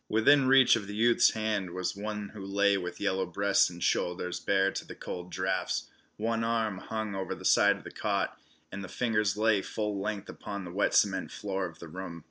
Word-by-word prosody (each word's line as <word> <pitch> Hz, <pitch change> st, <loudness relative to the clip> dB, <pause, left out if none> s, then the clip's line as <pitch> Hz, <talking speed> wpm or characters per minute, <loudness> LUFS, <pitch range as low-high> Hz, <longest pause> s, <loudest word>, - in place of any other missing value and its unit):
Within 130 Hz, +5 st, +5 dB
reach 135 Hz, -1 st, +7 dB
of 105 Hz, -3 st, -4 dB
the 105 Hz, -, -6 dB
youth's 115 Hz, +2 st, +4 dB
hand 105 Hz, -5 st, -2 dB
was 90 Hz, 0 st, -2 dB
one 105 Hz, 0 st, -4 dB
who 105 Hz, -2 st, -9 dB
lay 100 Hz, +1 st, +2 dB
with 90 Hz, -2 st, -4 dB
yellow 95 Hz, -2 st, 0 dB
breast 100 Hz, 0 st, +2 dB
and 85 Hz, -1 st, -7 dB
shoulders 90 Hz, 0 st, 0 dB
bare 95 Hz, +1 st, +2 dB
to -, -, -4 dB
the -, -, -10 dB
cold 90 Hz, 0 st, -7 dB
drafts. 95 Hz, +1 st, -2 dB, 0.3 s
One 115 Hz, +1 st, -1 dB
arm 110 Hz, -4 st, 0 dB
hung 110 Hz, 0 st, -4 dB
over 95 Hz, -1 st, -3 dB
the -, -, -11 dB
side -, -, +5 dB
of -, -, -14 dB
the -, -, -9 dB
cot, -, -, -1 dB, 0.4 s
and 100 Hz, 0 st, -6 dB
the -, -, -6 dB
fingers 105 Hz, -4 st, 0 dB
lay 110 Hz, -2 st, +3 dB
full 105 Hz, -1 st, -3 dB
length 105 Hz, -1 st, -3 dB
upon 100 Hz, -2 st, -6 dB
the 85 Hz, -, -7 dB
wet 100 Hz, -, +1 dB
cement 95 Hz, -2 st, +2 dB
floor 95 Hz, -2 st, -3 dB
of 85 Hz, -2 st, -13 dB
the 85 Hz, -, -10 dB
room. 85 Hz, 0 st, -7 dB
100 Hz, 210 wpm, -29 LUFS, 95-110 Hz, 0.4 s, reach